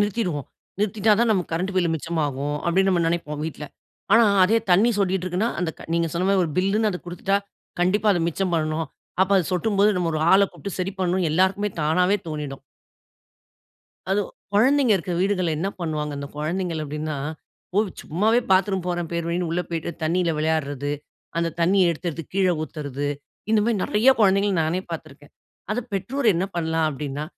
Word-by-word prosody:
நிறுத்திருவோம். 195 - -1 0.3
"நிறுத்திட்டா 210 +1 +2
தான் 235 -1 +3
நமக்கு 180 -5 -2
current 185 +4 -1
bill 175 -3 +2
மிச்சமாகும்." 145 -3 -2
அப்படின்னு 190 +3 +3
நம்ம 175 -2 +2
நினைப்போம் 150 -3 -2
வீட்டில. 155 -1 -5 0.5
ஆனா 230 +2 +7 0.2
அதே 220 +5 +3
தண்ணீர் 210 +5 +4
சொட்டிகிட்டு 190 -2 +1
இருக்குன்னா 185 +6 0
அந்த 175 -2 0
க - - -10
நீங்க 170 0 +2
சொன்ன 180 +2 0
மாதிரி 195 -1 +3
ஒரு 165 - -3
பில்ன்னு 205 +4 +2
அதை 180 - -4
கொடுத்துட்டா 180 +3 0 0.4
கண்டிப்பா 200 +4 +2
அத 175 - 0
மிச்சம் 180 +2 -2
பண்ணணும். 155 0 -1 0.4
அப்ப 190 - 0
அது 180 - +1
சொட்டும்போது 200 +2 +3
நம்ம 175 -2 0
ஒரு 155 - -1
ஆள 195 +1 +7
கூப்ட்டு 200 -2 -7
சரி 185 +2 -2
பண்ணனும் 185 0 +1
எல்லாருக்குமே 190 +4 +2
தானாவே 180 +6 +3
தோனிடும். 150 -3 -5 1.5
அது 200 +2 +3 0.3
குழந்தைங்க 260 +3 +4
இருக்கிற 180 -1 -3
வீடுகள்ல 185 -3 +1
என்ன 190 +5 -1
பண்ணுவாங்க? 155 -3 -2
அந்த 140 - -5
குழந்தைகள் 165 +2 -2
அப்படின்னா, 150 +1 -4 0.6
ஓ - - +5 0.2
சும்மாவே 215 +9 +2
பாத்ரூம் 190 -1 +3
போறேன் 175 -2 -2
பேர்வழின்னு 170 +1 -1
உள்ள 170 +2 0
போய்ட்டு 165 0 -3
தண்ணீல 170 +2 +1
விளையாடுறது, 145 -3 -1 0.5
அந்த 170 0 +1
தண்ணீய 180 +1 +4
எடுத்தெடுத்து 165 0 -5
கீழ 195 -1 +3 0.2
ஊத்துறது 145 -3 -4 0.4
இந்த 220 -1 +4
மாதிரி 225 -1 +1
நிறைய 215 +5 +2
குழந்தைகள்ல 200 0 +4
நானே 165 +4 0
பார்த்து 165 -1 -5
இருக்கேன். 140 +1 -18 0.4
அத 215 - 0
பெற்றோர் 235 +8 -2
என்ன 175 +3 0
பண்ணலாம்? 160 -1 +1
அப்படின்னா 145 0 -4
180 Hz, 165 wpm, -23 LUFS, 160-195 Hz, 1.5 s, ஆனா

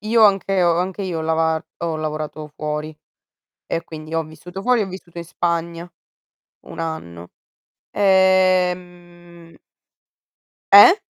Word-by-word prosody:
Io 220 +1 +2
anche 195 -2 +3
ho 170 -1 +3
anche 185 +2 -3
io 180 -4 -3
ho 160 - -3
lavar 160 0 0
ho 165 -2 -2
lavorato 155 0 -5
fuori 150 +1 -4 0.7
e 165 - -2
quindi 155 -1 -9
ho 165 - +1
vissuto 175 +4 -10
fuori, 245 0 +3
ho 200 - -3
vissuto 180 -2 -11
in 170 - -5
Spagna 170 0 -3 0.8
1 - - -8
anno, 90 - -6 0.6
ehm 180 -3 +1 1.2
Eh? 205 - +10
170 Hz, 125 wpm, -20 LUFS, 160-185 Hz, 1.2 s, Eh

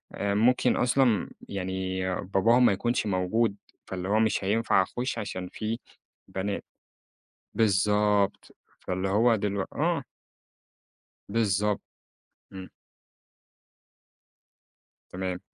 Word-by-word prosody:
آآ 100 0 -1
ممكن 125 +3 +3
أصلًا 120 -3 +2 0.2
يعني 95 -1 -3 0.2
باباهم 110 +6 +4
ما 100 - +5
يكونش 120 +4 0
موجود 100 +3 +1 0.3
فاللي 90 -1 -4
هو 105 +2 +3
مش 110 -3 +1
هينفع 105 +1 +3
أخش 125 +7 -3
عشان 95 -4 -4
في 110 +2 -3 0.5
بنات 100 +1 -3 0.9
بالضبط، 105 -1 +2 0.2
فاللي 95 +1 -2
هو 115 +4 +4
دلو 100 -2 -1
آه. - - +1 1.3
بالضبط، 105 -1 +1 0.7
إمم. 95 -1 -8 2.4
تمام. 90 -1 -3
100 Hz, 95 wpm, -27 LUFS, 95-115 Hz, 2.4 s, ما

